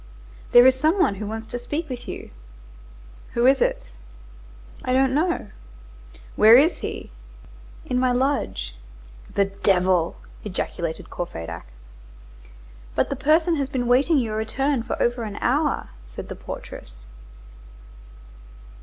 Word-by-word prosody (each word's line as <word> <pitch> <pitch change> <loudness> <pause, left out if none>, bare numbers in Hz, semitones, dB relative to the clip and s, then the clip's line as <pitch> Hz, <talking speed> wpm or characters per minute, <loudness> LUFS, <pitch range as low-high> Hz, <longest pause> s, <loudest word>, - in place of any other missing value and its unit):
"There 245 +1 +8
is 260 - +7
some 315 +7 +3
one 205 - +3
who 210 - -3
wants 220 +1 -5
to 245 +2 -5
speak 300 +7 -4
with 250 -3 -7
you." - - -7 1.0
"Who 235 +1 +2
is 265 0 +5
it?" - - 0 0.9
"I 255 - 0
don't 265 0 +3
know." 315 - 0 0.8
"Where 220 +2 +8
is 310 +6 +3
he?" - - -6 0.7
"In 250 - 0
my 255 0 +2
lodge." 245 - -1 0.6
"The 200 - +4
devil!" 185 -3 +1 0.3
ejaculated 170 -4 -4
Courfeyrac. 85 - -6 1.3
"But - - +1
the - - 0
person 315 +5 +3
has 275 -2 -1
been 255 -3 -2
waiting 270 +6 +4
your 220 -5 -1
return 270 +4 0
for - - -4
over 240 0 +1
an 210 -2 -5
hour," 290 +3 0 0.2
said - - -9
the - - -5
portress. - - -9
245 Hz, 130 wpm, -23 LUFS, 200-275 Hz, 1.3 s, There